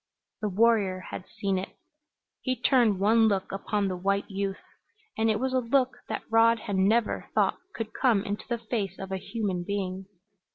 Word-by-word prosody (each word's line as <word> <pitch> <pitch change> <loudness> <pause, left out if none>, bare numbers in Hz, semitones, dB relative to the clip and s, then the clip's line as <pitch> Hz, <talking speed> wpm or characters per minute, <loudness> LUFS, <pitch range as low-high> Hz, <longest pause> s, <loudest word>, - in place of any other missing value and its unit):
The 210 - 0
warrior 200 -2 +3
had 185 - -6
seen 195 -2 -1
it. 190 - -8 0.6
He 255 -1 0
turned 235 -7 +3
one 220 +3 +5
look 195 -3 0
upon 200 +1 -1
the 185 - -2
white 200 +2 0
youth, 195 0 -2 0.6
and 225 0 +2
it 215 -1 +1
was 260 0 -1
a 260 - +3
look 255 +2 +1
that - - -3
Rod 230 +1 +5
had 200 - -3
never 210 +4 +2
thought - - +2 0.2
could 225 -1 -5
come 230 -7 +2
into 205 +1 -4
the 235 - 0
face 215 -5 -3
of 195 0 -7
a 190 - -1
human 195 -3 -3
being. 190 -1 -3
205 Hz, 180 wpm, -28 LUFS, 195-230 Hz, 0.6 s, one